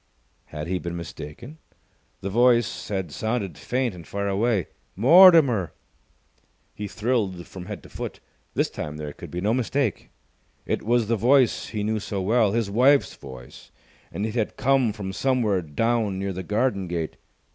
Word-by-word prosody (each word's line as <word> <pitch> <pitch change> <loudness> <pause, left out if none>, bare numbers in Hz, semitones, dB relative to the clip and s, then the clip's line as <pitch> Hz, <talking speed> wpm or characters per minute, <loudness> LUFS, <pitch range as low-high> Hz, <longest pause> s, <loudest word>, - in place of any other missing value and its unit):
Had 75 0 -6
he 90 +1 -2
been 85 -1 -5
mistaken? 85 - -9 0.6
The 100 - -4
voice 120 0 +2
had 95 -6 -3
sounded 110 -2 -2
faint 125 - -2
and 85 -3 -11
far 100 0 -3
away. 100 -1 +1 0.3
"Mortimer!" 140 - +6 1.0
He 105 - -5
thrilled 105 -5 -1
from 90 -1 -10
head - - -7
to - - -14
foot. - - -6 0.4
This - - +1
time 75 0 -6
there 75 -1 -6
could - - -10
be 90 - -4
no 105 +4 +1
mistake. 125 -2 -1 0.6
It - - -1
was 120 0 +1
the 115 +1 +1
voice 125 +3 +3
he 105 -2 -3
knew 110 +1 0
so 100 -1 -4
well, 105 +1 +2
his 115 -2 0
wife's 130 +7 +3
voice, 65 -3 -12 0.4
and 100 - -3
it 110 - -3
had 115 -3 -2
come 135 -4 +3
from 95 -2 -6
somewhere 115 -6 +1
down 105 +5 0
near 95 0 -3
the 95 - -5
garden 105 0 0
gate. 85 -2 -4
105 Hz, 165 wpm, -24 LUFS, 95-120 Hz, 1.0 s, Mortimer